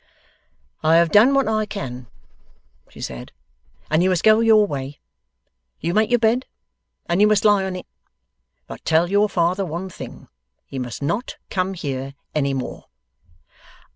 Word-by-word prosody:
'I 160 +1 +4
have 170 -1 +4
done 240 +7 +6
what 275 -3 +2
I 215 -1 0
can,' 130 - -6 0.8
she - - -15
said, 60 -1 -7 0.6
'and 155 +2 +3
you 185 - +3
must 180 -2 0
go 215 0 +6
your 220 -2 +5
way. 140 -5 -6 0.8
You 170 - -2
make 215 +2 +2
your 245 - +4
bed, 235 +3 +1 0.6
and 175 +3 +1
you 210 - +7
must 215 -1 +2
lie 205 -2 +5
on 190 -1 -4
it. 180 - -7 0.8
But - - -10
tell 165 +3 +2
your 205 +1 +3
father 180 +1 +1
one 180 +2 -5
thing: - - -10 0.4
he 135 - -7
must 125 +2 -5
not 205 - -2
come 190 0 -1
here 135 -4 -5 0.2
any 140 -2 0
more. 130 - -6
185 Hz, 160 wpm, -21 LUFS, 145-210 Hz, 0.8 s, you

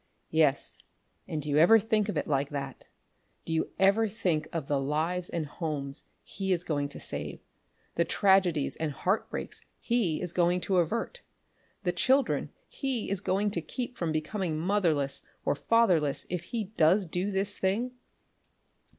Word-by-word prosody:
"Yes, 155 -3 +2 0.5
and 150 -2 -3
do - - -6
you 145 0 +2
ever 180 +8 +8
think 215 -1 +1
of 180 - -2
it - - 0
like 140 -1 +1
that? 140 -2 -6 0.6
Do 165 - -2
you 160 - 0
ever 200 +4 +4
think 175 -7 -1
of 165 -4 -3
the 145 -2 +1
lives 160 +6 -1
and 165 -2 -2
homes 145 -3 -4 0.2
he 190 -1 -3
is 175 -1 +1
going 145 -4 -1
to - - -9
save; - - -5 0.5
the 170 - +2
tragedies 185 -5 +3
and 155 -2 -2
heartbreaks 190 +9 -2 0.2
he 225 -10 +1
is 180 -2 -3
going 175 0 +3
to 190 0 +1
avert; 230 - 0 0.6
the 175 - +1
children 265 +7 +2 0.2
he 260 -7 -2
is 200 - -1
going 200 +2 +1
to 170 - -2
keep 245 +8 -5
from 170 -6 -1
being 155 +2 -2
motherless 165 -7 +1 0.2
or - - +3
fatherless 165 -5 +2
if 175 -1 -2
he 230 +2 -2
does 190 -1 +3
do 180 +4 -2
this 195 +1 -1
thing? 210 +7 0
175 Hz, 160 wpm, -29 LUFS, 155-205 Hz, 0.6 s, ever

